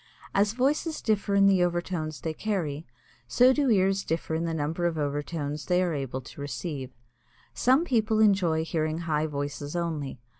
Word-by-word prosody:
As 205 +1 +2
voices 290 +6 0
differ 205 -2 0
in 200 0 +5
the 190 -2 +5
overtones 175 -5 -2
they 160 - -3
carry, 160 -7 -3 0.4
so 250 - +5
do 280 -1 +1
ears 195 -2 +3
differ 160 0 -2
in 165 +1 0
the 165 - -2
number 160 +3 -1
of 165 -2 -2
overtones 145 0 -3
they 180 0 +3
are 175 -2 0
able 135 -2 -3
to 130 +3 -11
receive. 145 -2 -4 0.6
Some 265 +7 +3
people 220 -6 +1
enjoy 190 -7 +3
hearing 160 0 -1
high 155 -1 0
voices 145 +1 -4
only. 155 -7 -3
170 Hz, 165 wpm, -27 LUFS, 150-200 Hz, 0.6 s, in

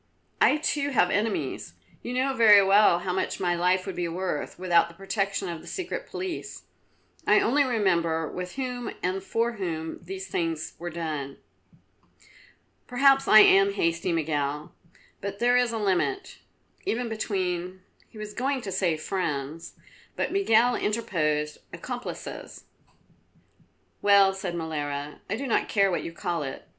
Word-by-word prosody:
I 300 - +5
too 295 -2 -1
have 230 -9 +2
enemies. 210 +1 -2 0.3
You 245 - -5
know 265 +2 +1
very 210 -5 +7
well 200 -2 +5
how 180 +1 -3
much 190 - -2
my 175 -2 +1
life 180 +2 +1
would 190 -3 -5
be 175 -1 -2
worth 175 -2 -3
without 175 -2 +3
the 170 - -15
protection 195 0 -2
of 170 -2 -5
the - - -15
Secret 390 +7 -5
Police. 370 -2 -5 0.6
I - - +6
only 285 +5 +3
remember 170 - +1
with 180 +2 -6
whom 250 -3 -4
and 185 +1 -1
for 230 +4 0
whom 160 -4 -4
these 190 +2 -7
things 165 -2 -2
were 175 +1 -4
done." 155 -5 -5 1.5
"Perhaps 270 +2 +4
I 215 - +9
am 195 0 +6
hasty, 170 -1 0
Miguel, 150 -2 -2 0.5
but 200 0 -5
there 245 +3 +3
is 245 -1 +3
a 230 - -3
limit, 220 - -1 0.4
even 240 +2 -1
between 185 -4 -3
" - - -32
He 225 - -15
was 210 0 -7
going 265 +3 -1
to 200 - -6
say 180 -4 +1
friends 155 -2 -4 0.4
but - - -2
Miguel 245 - +3
interposed 155 -9 -1
accomplices. - - -7 1.4
"Well," 200 -1 +5
said 190 -2 -4
Molara, 150 -3 -4
"I 200 - 0
do 270 +5 -5
not 240 - 0
care 195 -2 +3
what 175 - -1
you - - -5
call 170 -1 -3
it. 135 -2 -6
190 Hz, 150 wpm, -26 LUFS, 170-225 Hz, 1.5 s, I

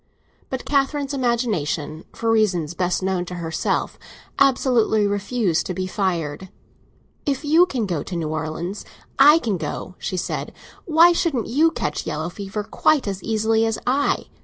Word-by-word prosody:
But 260 -1 -4
Catherine's 280 0 0
imagination, 195 - -1
for 230 -1 -1
reasons 185 -8 +1
best 180 +1 -1
known 190 -2 0
to 180 - -7
herself, 165 -2 -2 0.4
absolutely 245 -5 +3
refused 205 -2 0
to 185 - -4
be 185 0 -2
fired. 185 -3 -2 0.8
"If 280 +1 -1
you 325 +5 +5
can 250 -9 -2
go 170 -6 -2
to 180 - -6
New 165 -2 -2
Orleans, 160 +5 -4 0.4
I 295 +3 +8
can 225 - -1
go," 160 +3 -5
she 185 - -3
said. - - -3 0.3
"Why 335 +1 +6
shouldn't 320 - 0
you 305 +7 +3
catch 325 - -3
yellow 155 +2 -2
fever 200 +2 -5
quite 275 +4 +1
as 195 -1 -3
easily 220 0 +1
as 225 -1 0
I? 275 +3 +1
210 Hz, 155 wpm, -22 LUFS, 175-260 Hz, 0.8 s, I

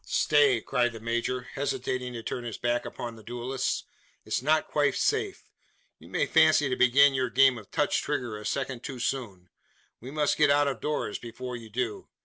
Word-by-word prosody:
"Stay!" 145 -5 +3
cried 120 0 0
the 115 - -8
major, 120 +2 -1
hesitating 130 -2 -2
to 115 -1 -6
turn 125 - -4
his 115 -3 -5
back 120 0 -1
upon 120 -1 -6
the 110 - -14
duellist. 125 +4 -3 0.4
"It's - - -1
not 155 +3 +2
quite 145 -1 +1
safe. 435 -3 0 0.6
You - - -15
may - - +1
fancy 155 -3 +4
to 125 - 0
begin 135 +3 +5
your 130 -2 0
game 135 +1 +5
of 105 - -15
touch - - +1
trigger 120 -4 -3
a 105 - -8
second 130 +2 -3
too 135 -1 -6
soon. 105 -8 -4 0.5
We 125 - -9
must 150 0 0
get 150 -1 +5
out 145 0 +4
of 140 - -3
doors 150 -8 -2
before 125 +2 -7
you 115 -2 -9
do. 115 0 -3
125 Hz, 190 wpm, -28 LUFS, 120-140 Hz, 0.6 s, begin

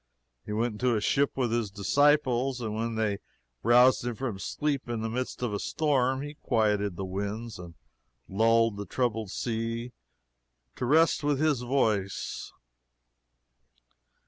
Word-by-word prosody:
He - - -4
went 115 +3 0
into 125 -2 +3
a - - +1
ship 140 +7 +1
with 125 -4 0
his 115 -3 0
disciples, 130 +4 +2
and 110 -3 -3
when 115 +1 -2
they 105 -3 0 0.4
roused 125 +2 +5
him 120 -1 -3
from 115 -5 -4
sleep 140 +2 -2
in 115 -2 -2
the 110 0 -3
midst 125 +1 -3
of 115 -4 -1
a 100 - -1
storm, 135 -2 +1
he 145 0 -6
quieted 105 -8 0
the 95 - -4
winds 100 +4 -4
and 85 -2 -10 0.5
lulled 115 +1 +3
the 100 -1 -6
troubled 110 -2 -1
sea 115 +2 -3 0.9
to 125 - -2
rest 160 +3 +4
with 145 -2 +1
his 150 -5 +2
voice. 110 -7 -1
115 Hz, 145 wpm, -28 LUFS, 105-130 Hz, 0.9 s, roused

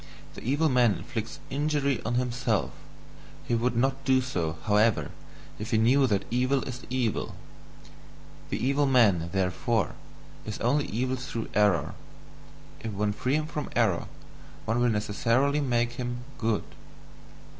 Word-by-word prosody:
The - - -9
evil 145 +6 +2
man 125 -7 +4
inflicts 115 +5 -5
injury 140 -3 0
on 120 +2 -1
himself; 125 -3 0 0.8
he - - 0
would 120 +1 +1
not 135 +3 +1
do 130 -1 +4
so, 90 -11 -2
however, 105 +4 +2 0.5
if 105 +2 -5
he 115 - +2
knew 130 +5 +4
that 100 -4 0
evil 130 +3 +2
is 125 0 -6
evil. 125 -3 -1 1.1
The - - -1
evil 140 +3 +2
man, 100 -11 +4
therefore, 95 +1 0 0.5
is 110 0 -5
only 140 +5 +2
evil 130 +4 -1
through 125 -3 -5
error; 100 -7 +2 0.9
if 115 - -5
one 105 +1 0
free 130 +5 0
him 155 0 0
from 150 -2 -4
error 105 -8 +2 0.6
one 115 +2 0
will 120 0 +3
necessarily 115 +7 +1
make 120 -3 +1
him 120 0 -4 0.2
good." 115 -3 0
120 Hz, 140 wpm, -28 LUFS, 110-130 Hz, 1.1 s, man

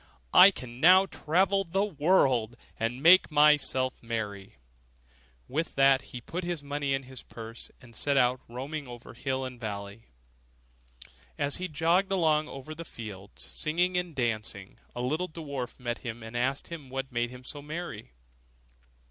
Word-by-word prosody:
I 190 - +10
can 125 -10 -9
now 185 +5 +7
travel 190 +3 +1
into 170 -3 -10
the 195 +1 +3
wide 180 -9 -10
world, 130 -9 +3 0.2
and 120 +4 -2
make 180 +3 +7
myself 145 -4 +3
merry.' 105 -4 -5 0.9
With 155 +6 -2
that 135 -1 +4
he 125 - -6
put 175 +9 -5
his 170 -4 -3
money 145 -1 -1
into 135 -1 -6
his 130 -1 -9
purse, 115 0 -9
and 120 -4 -15
set 140 +3 +1
out, 125 0 +3
roaming 140 +4 -5
over 120 0 -10
hill 130 +2 -2
and 125 -2 -8
valley. 100 0 -6 1.3
As 145 0 0
he 185 - -3
jogged 170 +5 +2
along 155 -5 +2
over 135 +3 -8
the 165 +2 -7
fields, 100 - -9
singing 175 +4 -1
and 180 -3 -2
dancing, 110 -5 -3 0.2
a 120 - -3
little 155 +8 -1
dwarf 140 -7 -6
met 120 -1 -3
him, 120 -2 -6
and 115 +1 -9
asked 130 +3 -1
him 155 -6 -8
what 135 +1 -4
made 120 0 0
him 125 +1 -11
so 145 +3 -8
merry. 150 -7 -6
135 Hz, 165 wpm, -29 LUFS, 120-160 Hz, 1.3 s, I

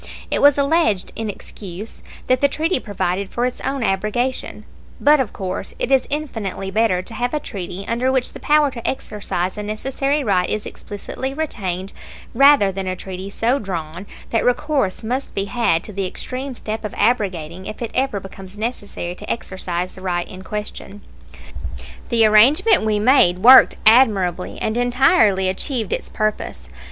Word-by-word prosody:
It - - +1
was 285 -1 +6
alleged 280 - +1
in 225 -1 -3
excuse 200 0 -8 0.2
that 255 0 +2
the 285 - +5
treaty 315 +2 0
provided 195 -3 -2
for 240 - -1
its 250 - -3
own 270 -2 -2
abrogation; 215 +6 -1 0.3
but 300 +1 +5
of 250 -6 -1
course 190 0 -5
it 260 - -1
is 265 -1 +3
infinitely 220 -10 -3
better 200 -4 +1
to 230 - -5
have 245 +5 -2
a - - 0
treaty 195 -6 -6
under 245 +3 +1
which 260 -2 0
the - - -9
power 295 -1 +3
to 235 -3 -5
exercise 205 -6 -3
a - - -2
necessary 270 +7 -1
right 190 -6 +1
is 215 - -2
explicitly 260 +6 -6
retained 195 - -3 0.4
rather 275 -8 +6
than 190 0 -4
a 185 - -1
treaty 190 +1 -7
so 235 +6 0
drawn 175 -1 -5 0.2
that 230 - +1
recourse 245 -5 0
must 255 +5 -3
be 195 - 0
had 200 -6 +1
to 210 - -8
the 195 -1 -2
extreme 255 +7 -5
step 220 -1 -5
of 210 - -5
abrogating 185 -6 0
if 215 - -7
it 235 - -4
ever 260 -5 0
becomes 195 +1 -11
necessary 205 -6 -4
to 205 +3 -10
exercise 185 -4 -3
the 185 - -12
right 175 -2 -2
in 185 0 -10
question. 205 0 -6 1.1
The 230 -2 +4
arrangement 255 - +5
we 215 -1 +1
made 210 -5 +4
worked 260 +2 +9
admirably, 205 -7 +4
and 220 +2 -1
entirely 245 - +3
achieved 220 +4 -1
its - - -4
purpose. 215 - -3
215 Hz, 165 wpm, -20 LUFS, 190-255 Hz, 1.1 s, worked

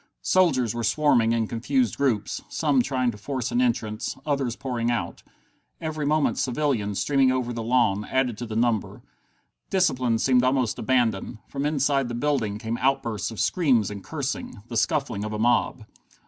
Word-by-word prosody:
Soldiers 135 - +3
were 120 0 -3
swarming 120 -1 +3
in 115 -1 +1
confused 230 - 0
groups, 120 -7 0
some 145 -5 +2
trying 130 -1 0
to 105 - -12
force 130 +2 -3
an 245 - +2
entrance, 110 - -1
others 135 -5 -1
pouring 120 -3 -2
out. 110 -8 -2 0.6
Every 155 -2 -3
moment 155 0 +1
civilians, 120 -7 0
streaming 135 -2 +3
over 125 -2 -1
the 115 - -4
lawn, 110 -4 +1
added 130 -3 0
to 120 - -5
the 110 - -5
number. 115 -2 0 0.7
Discipline 130 -11 +2
seemed 125 +2 +3
almost 130 -3 +1
abandoned. 115 -5 0
From 140 +1 -2
inside 140 -2 +1
the 120 - -4
building 120 -6 0
came 115 +2 -4
outbursts 115 -7 0
of 110 - -8
screams 130 - +2
and 100 -2 -7
cursing, 140 -8 -5
the 120 - -5
scuffling 125 -5 0
of 105 0 -4
a - - -2
mob. 120 0 +1
125 Hz, 165 wpm, -25 LUFS, 115-140 Hz, 0.7 s, Soldiers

